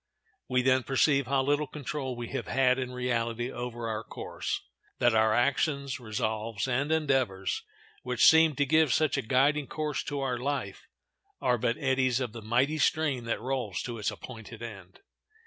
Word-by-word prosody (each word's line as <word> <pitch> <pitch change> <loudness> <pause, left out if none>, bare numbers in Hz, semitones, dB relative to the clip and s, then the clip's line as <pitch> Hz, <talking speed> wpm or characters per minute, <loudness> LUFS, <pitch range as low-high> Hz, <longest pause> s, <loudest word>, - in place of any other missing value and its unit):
We 125 0 +2
then 130 0 +4
perceive 140 +1 +2
how 135 0 +2
little 145 +2 +1
control 135 -2 -4
we 120 -1 -6
have - - -4
had 130 -1 +3
in 130 -1 -3
reality 120 -1 -1
over 120 -2 -5
our 110 0 -3
course; - - -4 0.4
that 120 -1 +3
our 110 0 +4
actions, 140 +3 +1
resolves, 110 -1 -2
and 135 +4 0
endeavors, 130 - 0 0.4
which 125 -1 +2
seemed 160 -3 +6
to 145 - +3
give 155 0 +4
such 155 +4 +2
a 135 - 0
guiding 135 +4 +2
course 150 -3 -2
to 145 -1 -3
our 125 -3 -1
life, 140 +2 -3 0.5
"Are 125 -1 +1
but 115 +2 0
eddies 130 -3 +1
of 125 -4 -2
the 115 - -7
mighty 125 +8 +1
stream 145 -5 +1
That 115 - -2
rolls 120 -7 -2
to 120 -2 -5
its 105 - 0
appointed 115 -2 -9
end." 100 -5 -10
130 Hz, 170 wpm, -29 LUFS, 115-140 Hz, 0.5 s, seemed